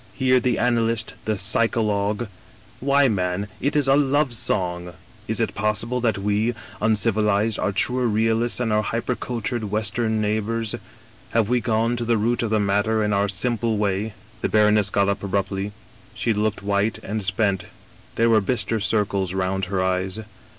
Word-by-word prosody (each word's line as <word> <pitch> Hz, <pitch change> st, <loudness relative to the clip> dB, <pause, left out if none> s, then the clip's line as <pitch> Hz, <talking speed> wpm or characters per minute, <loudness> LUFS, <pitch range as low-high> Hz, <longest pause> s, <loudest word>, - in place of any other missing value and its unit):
* -, -, -27 dB
Hear 130 Hz, -1 st, +3 dB
the 125 Hz, 0 st, 0 dB
analyst, 115 Hz, -2 st, +1 dB
the 110 Hz, -1 st, 0 dB
psycho 115 Hz, +3 st, +1 dB
logue 105 Hz, +1 st, 0 dB, 0.6 s
^why, 140 Hz, 0 st, +4 dB
man, 90 Hz, +1 st, -1 dB
it 140 Hz, +4 st, 0 dB
is 145 Hz, -2 st, +3 dB
a 135 Hz, -, +5 dB
love 145 Hz, -1 st, +2 dB
song! 90 Hz, -5 st, -1 dB, 0.3 s
Is 110 Hz, -, -1 dB
it 115 Hz, -, 0 dB
possible 110 Hz, +4 st, -1 dB
that 115 Hz, -3 st, +1 dB
we, 105 Hz, +4 st, 0 dB, 0.3 s
uncivilized, 110 Hz, 0 st, +2 dB
are -, -, 0 dB
truer 125 Hz, +5 st, 0 dB
realists 115 Hz, +2 st, +1 dB
than 120 Hz, -3 st, -1 dB
our 105 Hz, 0 st, +2 dB
hypercultured 120 Hz, 0 st, -2 dB
West 105 Hz, +2 st, -1 dB
em 110 Hz, -2 st, +1 dB
neighbors? 110 Hz, +1 st, -1 dB, 0.6 s
Have 115 Hz, -2 st, +2 dB
we 125 Hz, -1 st, +2 dB
gone 115 Hz, +1 st, +1 dB
to 120 Hz, -, -2 dB
the 115 Hz, 0 st, +2 dB
root 115 Hz, +3 st, +1 dB
of 115 Hz, -, -1 dB
the 110 Hz, 0 st, +2 dB
matter, 105 Hz, +2 st, +1 dB
in 105 Hz, 0 st, 0 dB
our 100 Hz, +1 st, +1 dB
simple 115 Hz, +3 st, 0 dB
way? 100 Hz, 0 st, -1 dB
' -, -, -26 dB
" -, -, -26 dB
The -, -, 0 dB
baroness 105 Hz, -1 st, +3 dB
got 100 Hz, 0 st, +2 dB
up 100 Hz, 0 st, -1 dB
abruptly. 100 Hz, 0 st, -2 dB, 0.4 s
She 115 Hz, -, 0 dB
looked 105 Hz, 0 st, -1 dB
white 100 Hz, +2 st, 0 dB
and 110 Hz, +1 st, -3 dB
spent; 95 Hz, 0 st, 0 dB, 0.5 s
there 115 Hz, 0 st, +3 dB
were 110 Hz, -1 st, +5 dB
bister 115 Hz, +1 st, 0 dB
circles 100 Hz, -3 st, 0 dB
round 95 Hz, 0 st, -1 dB
her 95 Hz, 0 st, -1 dB
eyes. 95 Hz, +1 st, -1 dB
110 Hz, 180 wpm, -23 LUFS, 100-115 Hz, 0.6 s, a